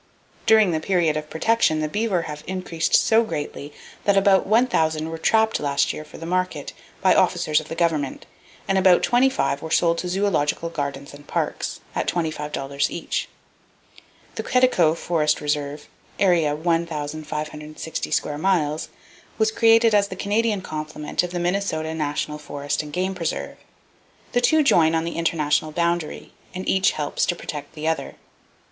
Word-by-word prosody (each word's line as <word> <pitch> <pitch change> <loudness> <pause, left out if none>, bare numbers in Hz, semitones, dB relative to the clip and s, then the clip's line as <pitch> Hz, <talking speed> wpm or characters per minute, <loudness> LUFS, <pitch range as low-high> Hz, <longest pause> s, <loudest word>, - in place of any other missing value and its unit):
During 220 -4 +6
the 160 - 0
period 170 -2 +1
of 155 0 -4
protection 190 -2 +2
the 155 - 0
beaver 200 0 0
have 150 -1 -7
increased 180 -3 -1
so 225 +1 +4
greatly 145 -7 -5 0.3
that 200 -1 +4
about 195 -1 +4
1,000 160 -9 +2
were 165 0 -6
trapped 220 +6 +2
last 140 -1 +1
year 155 - -7
for 150 - -13
the 165 - -8
market, 180 -4 -2 0.3
by - - +5
officers 155 -1 +2
of 155 - -10
the 165 - -6
government; 160 -5 -1 0.4
and 195 0 +2
about 185 -2 +5
25 245 - +2
were 160 - -6
sold 170 +1 +2
to 180 - -3
zoological 175 -4 0
gardens 140 -3 -4
and 145 0 -14
parks, - - -3
at - - -2
$25 150 -4 -2
each. 170 - -3 1.0
The - - -4
Quetico 215 -11 +3
Forest 155 -3 0
Reserve, 145 0 -3 0.3
area 170 -6 +3
1,560 155 -1 -3
square 150 0 -1
miles, 160 -4 0 0.5
was 220 0 +2
created 225 0 +4
as 205 -1 +4
the - - -7
Canadian 210 0 0
complement 155 -2 -3
of 180 - -3
the 175 - -4
Minnesota 175 -3 -1
National 150 -1 -2
Forest 145 -1 -3
and 150 -1 -9
Game 185 +3 -1
Preserve. 170 -3 -4 0.7
The 245 - +2
two 315 +4 +4
join 165 - +4
on 160 - +1
the 170 0 -4
international 155 -2 +1
boundary, 170 -1 -2 0.2
and 185 - -5
each 190 0 +3
helps 145 -1 -2
to 175 - 0
protect 150 -3 -7
the 155 0 -4
other. 160 - -2
165 Hz, 155 wpm, -23 LUFS, 150-190 Hz, 1.0 s, During